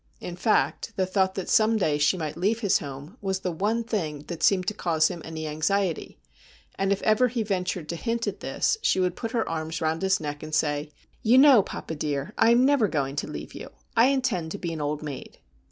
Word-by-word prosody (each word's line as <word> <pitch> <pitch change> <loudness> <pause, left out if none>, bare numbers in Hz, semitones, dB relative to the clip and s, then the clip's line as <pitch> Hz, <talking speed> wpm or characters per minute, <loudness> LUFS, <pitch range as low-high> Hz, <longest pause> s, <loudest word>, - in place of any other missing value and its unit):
In 175 - -6
fact, 220 +3 0
the 190 - +1
thought 190 0 +1
that 190 - -4
some 220 +1 +4
day 150 -7 +1
she 150 +5 +3
might 155 -3 -4
leave 210 +6 0
his 200 -4 +3
home 145 - -9
was 190 -1 -2
the 180 - -2
one 210 +7 0
thing 160 -11 -3
that 170 - -5
seemed 185 -2 +3
to - - -6
cause 160 -5 +1
him 170 - -6
any 160 -1 -6
anxiety, 160 +4 -1 0.6
and 195 0 -1
if 200 - 0
ever 220 +4 +4
he 235 -1 -2
ventured 180 -5 -2
to 170 - -2
hint 230 +5 -2
at - - -4
this 445 -2 0
she 475 - +2
would 180 -1 +1
put 230 - -4
her 230 -2 -1
arms 160 0 -3
round 160 0 -1
his 190 0 +2
neck 145 -2 -5
and 155 0 -4
say: 150 -1 0 0.2
' - - -37
You 235 +3 +4
know 270 -4 +8
papa, 165 - -6
dear, 145 -2 -3
I 225 - +4
am 240 +2 +5
never 275 -6 +4
going 140 -5 -2
to - - -2
leave - - -7
you. - - -8 0.3
I 230 - +6
intend 255 -12 0
to - - -4
be 170 -4 -4
an 160 - -5
old 150 +1 -2
maid.' 145 -3 -7
185 Hz, 235 wpm, -26 LUFS, 155-220 Hz, 0.6 s, know